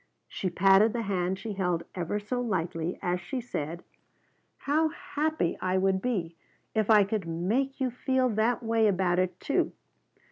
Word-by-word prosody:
She 185 - -3
patted 195 +4 +5
the 235 -1 -1
hand 190 -2 -1
she 220 +1 -5
held 180 -3 -1
ever 180 +3 -2
so 245 +4 -3
lightly 175 -6 -2
as 180 -1 0
she 255 +9 -4
said: 170 -8 -5 0.7
"How 310 +3 +1
happy 305 - -2
I 185 0 +1
would 190 0 +2
be 185 -9 -2 0.4
if 215 -1 0
I 210 -2 +7
could 195 -3 -2
make 215 +12 -1
you 260 -2 0
feel 260 +1 +1
that 230 +2 +1
way 225 -1 +3
about 185 -3 +2
it, 185 0 -1
too. 280 - 0
195 Hz, 165 wpm, -28 LUFS, 180-240 Hz, 0.7 s, I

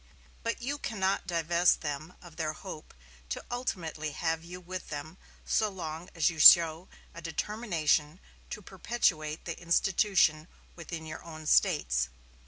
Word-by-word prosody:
But 230 +1 -3
you 285 +3 -2
cannot 195 -6 -1
divest 170 0 +2
them 155 +3 -5
of 170 -3 -13
their 155 -2 -2
hope 155 -2 -10 0.3
to - - -4
ultimately 165 - -3
have 160 +1 -1
you 180 +2 -9
with 180 +1 -7
them 155 +4 -7 0.3
so 215 - +1
long 170 -2 -7
as 165 - +2
you 165 -2 -1
show 165 +2 +8 0.3
a 170 - -9
determination 165 -3 -1 0.3
to 210 - -7
perpetuate 175 -6 -1
the 170 - -5
institution 170 -2 +2 0.3
within 165 -1 -7
your 155 0 -8
own 155 -2 -10
States. - - +2
165 Hz, 140 wpm, -30 LUFS, 155-185 Hz, 0.3 s, show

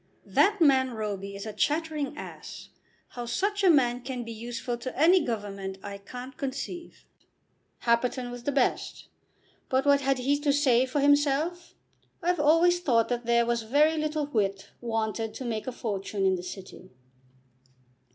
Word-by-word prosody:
That 410 +1 +3
man 260 -6 +4
Roby 200 -2 -4
is 200 - -7
a 215 - -5
chattering 305 0 -1
ass. - - -9 0.4
How 240 -1 -7
such 405 - -1
a 375 - +6
man 250 -6 +3
can 255 -1 -5
be 230 - -7
useful 235 +2 -4
to 255 +2 -6
any 345 +3 +5
government 200 -5 -4
I 200 0 -7
can't 250 +6 -9
conceive. 285 +4 -6 0.8
Happerton 245 +1 +1
was 245 0 -7
the 285 - -1
best, 270 -2 -1 0.6
but 265 +1 +1
what 285 0 +5
had 270 -1 +1
he 275 +3 +1
to 290 -1 +2
say 260 -3 +3
for 275 +3 -1
himself? 290 +4 +2 0.5
I've 350 -1 +1
always 330 +4 +4
thought 235 -9 +2
that 240 -1 -2
there 235 0 +4
was 235 0 0
very 290 +8 +3
little 305 -1 -1
wit 200 -8 -2
wanted 225 -1 -2
to 260 - -6
make 225 -1 -3
a - - -1
fortune 200 -4 -3
in 190 - +4
the 180 - -2
City." 185 0 -9
250 Hz, 160 wpm, -27 LUFS, 225-290 Hz, 0.8 s, a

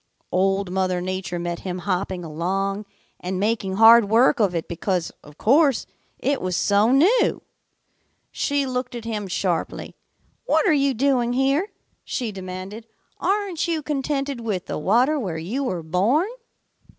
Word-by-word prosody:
"Old 195 0 +1
Mother 185 -1 0
Nature 185 -1 -3
met 170 0 -3
him 185 -1 -5
hopping 185 0 -2
along 195 +6 -2 0.3
and 185 +1 -3
making 205 -2 -1
hard 225 +2 +8
work 245 +5 +4
of 195 -5 +2
it 165 - -2
because, 175 0 -2
of 150 0 -15
course, 275 +1 +3 0.3
it 280 0 -1
was 185 -1 -2
so 205 +4 +3
new. 355 - +3 0.9
She 285 -1 0
looked 250 -1 -3
at 235 -1 -7
him 210 -3 -3
sharply. 180 -2 -2 0.5
'What - - +2
are 335 - +5
you 280 -2 +2
doing 245 -1 +1
here?' 275 +9 +1 0.3
she 235 -4 -3
demanded. 190 +3 -7 0.3
'Aren't 390 -5 -1
you 325 -3 -1
contented 275 -2 -2
with 210 -6 -3
the - - -4
water 245 - +2
where 185 -10 -3
you 210 +13 -3
were 180 -9 -3
born?' 210 - +1
210 Hz, 150 wpm, -23 LUFS, 185-270 Hz, 0.9 s, hard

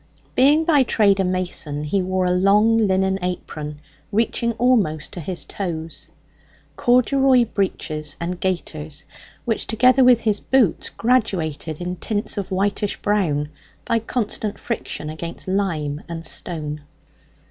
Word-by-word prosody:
Being 295 +5 +4
by 300 -4 +5
trade 205 -5 +3
a - - +3
mason, 180 -5 -2
he 175 +6 0
wore 185 0 0
a 180 - +2
long 200 +5 +4
linen 190 0 +1
apron 155 -4 -5 0.3
reaching 230 +2 0
almost 215 - +1
to - - -5
his 175 +2 -3
toes, 165 -4 -5 0.7
corduroy 255 +1 +4
breeches 155 -8 -3
and 175 +1 -4
gaiters, 155 -4 -3 0.4
which, 225 -3 -1
together 255 +4 +4
with 250 -2 +6
his 210 -2 +1
boots, 250 -10 +2
graduated 170 - 0
in 180 0 -4
tints 210 +3 -2
of 200 -2 -4
whitish 200 +1 -1
brown 160 -8 +1 0.4
by 230 - +1
constant 220 -2 -2
friction 225 -9 -4
against 165 +4 -7
lime 165 -7 -1
and 165 -1 -6
stone. 150 -2 -5
190 Hz, 130 wpm, -22 LUFS, 160-225 Hz, 0.7 s, with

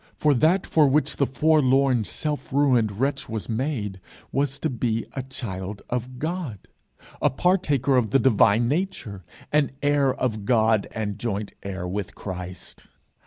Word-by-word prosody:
For 150 -1 +3
that 160 +9 +3
for 155 -3 +4
which 150 +3 +1
the 140 - +2
forlorn, 135 -5 +3
self 150 - -3
ruined 125 -7 +2
wretch 135 +1 -1
was 110 -2 -4
made, 110 -5 -2 0.3
was 140 0 0
to 155 - -1
be 115 -2 -1
a 135 - -3
child 100 -6 -6
of 125 +1 -3
God, 155 - -4 0.5
a - - +4
partaker 140 -4 +2
of 115 -4 +2
the 135 - +4
divine 115 -3 +4
nature, 140 - -3 0.3
an 150 -1 +3
heir 145 -2 +3
of 110 -5 -2
God 110 -1 +3
and 105 -3 -4
joint 105 -3 -3
heir 95 -2 -5
with 100 +1 -4
Christ. 90 -2 -7
125 Hz, 150 wpm, -24 LUFS, 105-145 Hz, 0.5 s, for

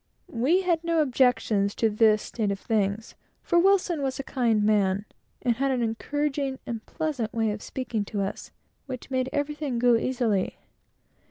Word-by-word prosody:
We 275 +11 +3
had 340 -2 +1
no 335 -1 +1
objections 245 -7 +2
to 225 - +2
this 215 0 +3
state 215 -4 -2
of 200 -1 -2
things, 210 0 -1 0.3
for 345 - +3
Wilson 365 -4 +3
was 265 -1 -2
a 275 - -4
kind 245 -4 +1
old - - +1
man, 205 -1 +2 0.4
and 240 -3 +1
had 275 +1 +1
an 255 -3 0
encouraging 275 +4 -2
and 225 -2 -5
pleasant 300 -9 -2
way 225 -2 +1
of 210 0 -5
speaking 240 -5 -3
to 205 -1 -3
us, 195 - -5 0.4
which 260 0 -7
made 260 0 0
everything 290 -3 -2
go 240 0 +4
easily. 225 -5 0
245 Hz, 170 wpm, -26 LUFS, 220-280 Hz, 0.4 s, go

